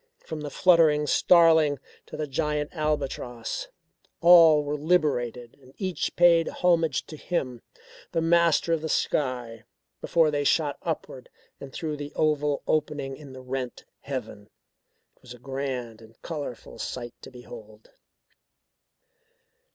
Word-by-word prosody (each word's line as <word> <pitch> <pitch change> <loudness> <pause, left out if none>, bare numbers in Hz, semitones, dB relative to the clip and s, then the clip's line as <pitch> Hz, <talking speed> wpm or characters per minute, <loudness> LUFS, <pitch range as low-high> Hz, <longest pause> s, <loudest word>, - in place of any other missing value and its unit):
From 160 -2 -8
the 150 - -5
fluttering 160 -3 +4
starling 160 -3 +4 0.3
to - - -8
the 155 - -2
giant 150 +1 -2
albatross, 150 - -3 0.5
all 165 -3 +7
were 145 +1 -3
liberated 140 -7 0
and 130 +1 -19
each 185 -3 -3
paid 170 -2 +5
homage 165 -5 +1
to 155 - -10
him 130 -7 -3 0.5
the - - 0
master 170 0 +3
of 165 - 0
the 160 - -4
sky, 125 -7 -1 0.4
before 165 -3 +2
they 145 -1 -1
shot 145 0 +1
upward 145 -6 -5 0.3
and 135 - -9
through 155 +1 -4
the 145 0 -7
oval 150 -2 0
opening 145 -3 -1
in 140 -2 -12
the 130 - -10
rent 130 -1 -5
heaven. 110 -6 -7 0.7
It - - -33
was 125 -1 -11
a - - -15
grand 125 -3 -5
and 110 0 -18
colourful 145 -7 -7
sight 120 -1 -5
to - - -10
behold. 115 -4 -13
145 Hz, 135 wpm, -26 LUFS, 130-160 Hz, 0.7 s, all